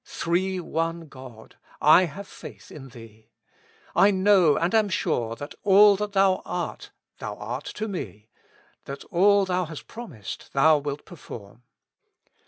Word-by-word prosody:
Three 185 Hz, +2 st, -1 dB
One 165 Hz, 0 st, -2 dB
God, 130 Hz, -5 st, -13 dB, 0.2 s
I 155 Hz, +5 st, +6 dB
have 195 Hz, +5 st, -9 dB
faith -, -, -12 dB
in 135 Hz, -3 st, -10 dB
Thee. 115 Hz, -2 st, -15 dB, 0.7 s
I 200 Hz, -, +6 dB
know 190 Hz, -5 st, +4 dB
and 170 Hz, +4 st, 0 dB
am 215 Hz, -2 st, +3 dB
sure 120 Hz, -11 st, -1 dB
that 145 Hz, +4 st, -8 dB
all 205 Hz, +1 st, +7 dB
that 210 Hz, 0 st, -4 dB
Thou 195 Hz, -1 st, +3 dB
art 175 Hz, -2 st, -5 dB, 0.3 s
Thou 105 Hz, 0 st, -5 dB
art 120 Hz, +7 st, -6 dB
to 220 Hz, -, -3 dB
me, 110 Hz, -, -7 dB, 0.6 s
that 140 Hz, 0 st, -7 dB
all 200 Hz, +3 st, +4 dB
Thou 185 Hz, -1 st, -1 dB
hast 155 Hz, -2 st, -9 dB
promised 160 Hz, -, -9 dB
Thou 150 Hz, +2 st, +5 dB
wilt 145 Hz, 0 st, -5 dB
perform. 120 Hz, -, -11 dB
165 Hz, 145 wpm, -25 LUFS, 130-195 Hz, 0.7 s, all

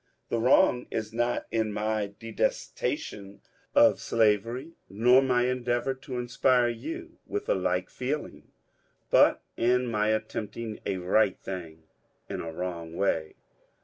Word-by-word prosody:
The 115 Hz, -, 0 dB
wrong 125 Hz, 0 st, +4 dB
is 110 Hz, -1 st, -4 dB
not 120 Hz, +1 st, 0 dB
in 110 Hz, -1 st, 0 dB
my 105 Hz, 0 st, -1 dB
detestation 105 Hz, -3 st, -3 dB, 0.4 s
of -, -, +6 dB
slavery, 115 Hz, +6 st, +1 dB, 0.2 s
nor 120 Hz, +7 st, +5 dB
my 125 Hz, -2 st, +2 dB
endeavour 125 Hz, +1 st, 0 dB
to 130 Hz, -1 st, -7 dB
inspire 125 Hz, 0 st, +2 dB
you 115 Hz, -1 st, -6 dB
witih -, -, -3 dB
a -, -, +5 dB
like 90 Hz, -1 st, 0 dB
feel 140 Hz, +4 st, -2 dB
ing, -, -, -15 dB, 0.6 s
but -, -, +5 dB
in 125 Hz, +2 st, +2 dB
my 105 Hz, -3 st, 0 dB
attempting 110 Hz, 0 st, -3 dB
a 95 Hz, -, -1 dB
right 95 Hz, +2 st, +2 dB
thing 85 Hz, -4 st, -7 dB, 0.4 s
in -, -, -4 dB
a 80 Hz, -, -5 dB
wrong 85 Hz, -1 st, -5 dB
way. 80 Hz, -5 st, 0 dB
115 Hz, 135 wpm, -28 LUFS, 100-125 Hz, 0.6 s, of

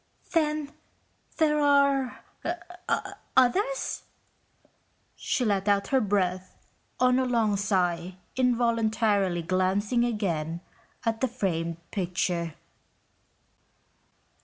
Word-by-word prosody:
"Then 305 Hz, -3 st, 0 dB, 0.6 s
there 300 Hz, -2 st, +3 dB
are... 280 Hz, -2 st, +3 dB, 1.1 s
others?" 400 Hz, -, +2 dB, 1.1 s
She 250 Hz, -, -1 dB
let 200 Hz, -2 st, +1 dB
out 200 Hz, -1 st, +2 dB
her 265 Hz, -1 st, +3 dB
breath 185 Hz, -3 st, -1 dB, 0.4 s
on 250 Hz, 0 st, +4 dB
a 260 Hz, -, +1 dB
long 230 Hz, -4 st, +2 dB
sigh 180 Hz, -3 st, 0 dB, 0.2 s
involuntarily 225 Hz, -7 st, +2 dB
glancing 190 Hz, +7 st, +1 dB
again 170 Hz, -8 st, -1 dB, 0.4 s
at 225 Hz, -1 st, 0 dB
the 260 Hz, -, +3 dB
framed 170 Hz, -8 st, -2 dB
picture. 175 Hz, -3 st, -1 dB
215 Hz, 85 wpm, -27 LUFS, 185-255 Hz, 1.1 s, on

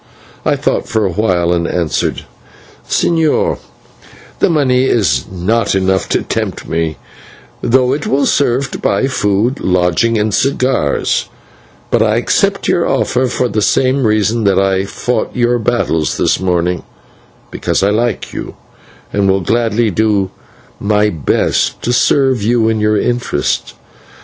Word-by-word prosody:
I -, -, +1 dB
thought -, -, -1 dB
for 110 Hz, -2 st, +1 dB
a 95 Hz, -, 0 dB
while 90 Hz, -3 st, +1 dB
and 85 Hz, -1 st, -1 dB
answered: 85 Hz, -3 st, -2 dB, 0.6 s
"Señor, 160 Hz, -3 st, +1 dB, 0.8 s
the -, -, +3 dB
money 130 Hz, -5 st, +2 dB
is 75 Hz, -, +1 dB
not 95 Hz, +5 st, 0 dB
enough 95 Hz, -1 st, 0 dB
to -, -, 0 dB
tempt -, -, -4 dB
me, 80 Hz, -1 st, -2 dB, 0.6 s
though 125 Hz, +1 st, +2 dB
it 145 Hz, +1 st, -3 dB
will 140 Hz, +1 st, +1 dB
serve 135 Hz, 0 st, +1 dB
to -, -, -6 dB
buy -, -, +1 dB
food, 115 Hz, 0 st, 0 dB
lodging, 90 Hz, +5 st, +1 dB
and 105 Hz, -1 st, 0 dB
cigars, 130 Hz, -, 0 dB, 0.6 s
but -, -, +2 dB
I -, -, +2 dB
accept -, -, 0 dB
your -, -, +2 dB
offer 130 Hz, +1 st, +1 dB
for 125 Hz, 0 st, -1 dB
the 110 Hz, -2 st, -1 dB
same 130 Hz, +3 st, +2 dB
reason 110 Hz, +1 st, +1 dB
that 100 Hz, -2 st, +3 dB
I 95 Hz, 0 st, +1 dB
fought 125 Hz, +5 st, -3 dB
your 120 Hz, -1 st, +1 dB
battles 105 Hz, -9 st, 0 dB
this -, -, +1 dB
morning, 90 Hz, -1 st, 0 dB, 0.7 s
because -, -, -1 dB
I 100 Hz, -, +3 dB
like 115 Hz, 0 st, -1 dB
you, -, -, -6 dB, 0.6 s
and 100 Hz, -1 st, +1 dB
will 95 Hz, 0 st, +2 dB
gladly 115 Hz, +3 st, +1 dB
do 100 Hz, -2 st, +1 dB, 0.5 s
my 105 Hz, 0 st, +1 dB
best 75 Hz, -6 st, 0 dB
to 120 Hz, -, 0 dB
serve 130 Hz, -1 st, +2 dB
you 115 Hz, +1 st, +2 dB
and 110 Hz, -1 st, 0 dB
your 105 Hz, 0 st, +2 dB
interests. 120 Hz, +2 st, -1 dB
110 Hz, 145 wpm, -14 LUFS, 95-125 Hz, 0.8 s, the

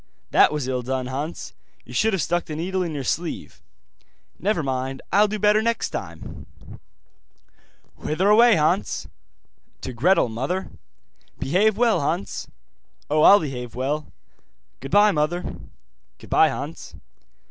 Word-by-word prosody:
'That -, -, +5 dB
was 150 Hz, -4 st, -3 dB
ill 130 Hz, -1 st, -1 dB
done, 130 Hz, +1 st, -3 dB
Hans. 140 Hz, +6 st, -5 dB, 0.3 s
You -, -, -12 dB
should 220 Hz, -, +2 dB
have 190 Hz, -, 0 dB
stuck 175 Hz, 0 st, -1 dB
the 155 Hz, -, -6 dB
needle 185 Hz, +4 st, -2 dB
in 165 Hz, -4 st, -3 dB
your 140 Hz, -, -3 dB
sleeve.' 165 Hz, +6 st, -4 dB, 0.8 s
'Never 195 Hz, -4 st, 0 dB
mind, 130 Hz, 0 st, -3 dB
I'll 205 Hz, +2 st, +5 dB
do 215 Hz, +1 st, -3 dB
better 210 Hz, +1 st, +3 dB
next 230 Hz, +1 st, -1 dB
time.' -, -, -7 dB, 1.5 s
'Whither 165 Hz, +6 st, -1 dB
away, 225 Hz, +2 st, +6 dB
Hans?' 165 Hz, +5 st, 0 dB, 0.7 s
'To 130 Hz, -, -5 dB
Gretel, 165 Hz, +7 st, +3 dB
mother.' 135 Hz, +12 st, -3 dB, 0.7 s
'Behave 195 Hz, +9 st, +2 dB
well, 235 Hz, -2 st, +3 dB
Hans.' 170 Hz, +7 st, -3 dB, 0.6 s
'Oh, 155 Hz, 0 st, +3 dB
I'll 200 Hz, +6 st, +8 dB
behave 125 Hz, -, -6 dB
well. 145 Hz, +4 st, -2 dB, 0.7 s
Goodbye, 205 Hz, +2 st, +4 dB
mother.' 160 Hz, +2 st, -1 dB, 0.7 s
'Goodbye, -, -, +3 dB
Hans. -, -, -7 dB
165 Hz, 130 wpm, -23 LUFS, 135-200 Hz, 1.5 s, I'll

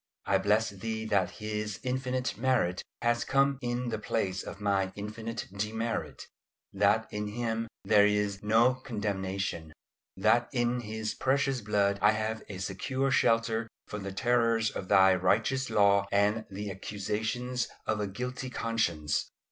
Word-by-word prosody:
I -, -, +3 dB
bless 105 Hz, +1 st, +2 dB
Thee 110 Hz, +3 st, -4 dB
that 100 Hz, -4 st, +2 dB
His 105 Hz, -1 st, -4 dB
infinite 130 Hz, 0 st, -1 dB
merit 115 Hz, -6 st, +1 dB, 0.2 s
has 120 Hz, 0 st, +2 dB
come 135 Hz, 0 st, +2 dB
in 120 Hz, 0 st, -2 dB
the 110 Hz, -2 st, -2 dB
place 95 Hz, -3 st, -1 dB
of -, -, -8 dB
my 100 Hz, -2 st, +1 dB
infinite 110 Hz, +3 st, -5 dB
demerit, 110 Hz, +3 st, -3 dB, 0.5 s
that 105 Hz, +3 st, +3 dB
in 105 Hz, 0 st, -2 dB
Him 115 Hz, +1 st, -2 dB, 0.2 s
there 105 Hz, -1 st, +6 dB
is 105 Hz, -1 st, 0 dB
"no 115 Hz, +4 st, +4 dB
condemnation;" 100 Hz, -, -3 dB, 0.4 s
that 120 Hz, +1 st, +3 dB
in 120 Hz, -1 st, +1 dB
His 110 Hz, -1 st, -4 dB
precious 135 Hz, -1 st, +1 dB
blood 100 Hz, -1 st, +1 dB
I 105 Hz, +1 st, +5 dB
have 110 Hz, +1 st, -2 dB
a 100 Hz, -, -6 dB
secure 130 Hz, +9 st, -1 dB
shelter 115 Hz, -2 st, +2 dB, 0.2 s
from 105 Hz, -, -6 dB
the 100 Hz, 0 st, -5 dB
terrors 115 Hz, +1 st, +2 dB
of 95 Hz, -, -6 dB
Thy 95 Hz, -1 st, +6 dB
righteous 110 Hz, +8 st, +1 dB
law 100 Hz, -2 st, +4 dB
and 105 Hz, +2 st, +2 dB
the 100 Hz, +1 st, -5 dB
accusations 110 Hz, +6 st, -2 dB, 0.2 s
of 110 Hz, -1 st, 0 dB
a 105 Hz, -, -1 dB
guilty 125 Hz, +5 st, -4 dB
conscience. 85 Hz, -12 st, -1 dB
110 Hz, 145 wpm, -30 LUFS, 100-120 Hz, 0.5 s, there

